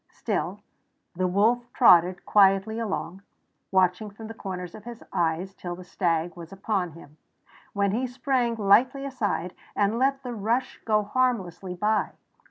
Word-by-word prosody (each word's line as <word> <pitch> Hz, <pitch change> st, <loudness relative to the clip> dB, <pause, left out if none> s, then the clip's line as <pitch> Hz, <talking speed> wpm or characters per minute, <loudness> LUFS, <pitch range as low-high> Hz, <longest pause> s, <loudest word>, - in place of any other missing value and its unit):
Still -, -, -3 dB, 0.5 s
the 185 Hz, +1 st, 0 dB
wolf 230 Hz, +6 st, +2 dB
trotted 180 Hz, -6 st, +5 dB
quietly 200 Hz, +2 st, +4 dB
along, 195 Hz, -4 st, -4 dB, 0.5 s
watching 190 Hz, +2 st, +2 dB
from 215 Hz, +2 st, -11 dB
the 225 Hz, -, -7 dB
corners 180 Hz, -5 st, -6 dB
of 215 Hz, -, -11 dB
his 235 Hz, 0 st, -9 dB
eyes 170 Hz, +3 st, 0 dB
till 175 Hz, -2 st, -6 dB
the 180 Hz, -, -10 dB
stag 175 Hz, -2 st, -1 dB
was 170 Hz, -1 st, -10 dB
upon 195 Hz, -3 st, -2 dB
him, 155 Hz, -2 st, -15 dB, 0.6 s
when 200 Hz, -1 st, +1 dB
he 250 Hz, +5 st, -1 dB
sprang 245 Hz, -1 st, 0 dB
lightly 240 Hz, +6 st, +3 dB
aside 205 Hz, -10 st, -2 dB, 0.2 s
and 205 Hz, +3 st, +1 dB
let 270 Hz, +1 st, +1 dB
the 250 Hz, -2 st, -5 dB
rush 235 Hz, +4 st, -1 dB
go 215 Hz, -1 st, +2 dB
harmlessly 205 Hz, -6 st, -1 dB
by. 210 Hz, +4 st, 0 dB
200 Hz, 150 wpm, -26 LUFS, 180-235 Hz, 0.6 s, trotted